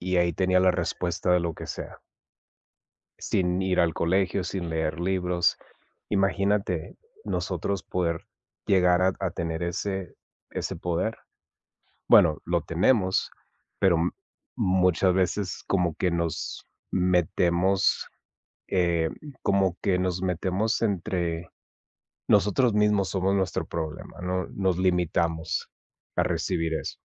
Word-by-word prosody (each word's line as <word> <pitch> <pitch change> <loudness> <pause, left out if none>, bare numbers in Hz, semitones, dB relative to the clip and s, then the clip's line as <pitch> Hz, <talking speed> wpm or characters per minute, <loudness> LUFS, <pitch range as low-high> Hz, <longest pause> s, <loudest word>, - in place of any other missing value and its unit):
y 90 +1 -1
ahí 85 -1 +3
tenía 90 +2 +2
la 95 0 +5
respuesta, 90 0 -1
de 90 - +5
lo 85 -1 -2
que - - -8
sea - - -7 1.2
sin 90 0 0
ir 95 -1 +1
al 85 -1 +3
colegio, 95 +2 +1
sin 90 -3 -4
leer 80 -1 -1
libros. 90 -1 +1 0.5
Imagínate, 95 -3 0 0.3
nosotros 100 -3 -2
poder 85 -2 -2 0.4
llegar 90 -2 +4
a 95 0 +3
a 95 -2 -1
tener 85 0 -3
ese 95 +1 -3 0.4
ese - - -3
poder. 90 +6 -2 0.9
Bueno, 80 -3 +6
lo 85 -1 +1
tenemos, 95 +4 +2 0.5
pero 95 -3 +4
m 85 +2 +1 0.4
muchas 90 0 +3
veces 95 +1 -1
como 90 -5 +1
que 90 - 0
nos 85 -2 -3 0.3
metemos 90 +1 +2 0.6
eh, 85 -3 +1 0.3
como 95 -2 +2
que 95 -3 +2
nos 90 0 -1
metemos 95 +4 0
entre 90 -5 -1 0.8
nosotros 105 +4 +3
mismos 105 -2 +3
somos 95 0 +1
nuestro 95 -2 -1
problema, 80 0 -6
¿no?, 90 0 -1
nos 95 -2 0
limitamos 85 -3 0 0.5
a - - +4
recibir 80 -1 -1
eso. - - -4
90 Hz, 120 wpm, -26 LUFS, 85-95 Hz, 1.2 s, Bueno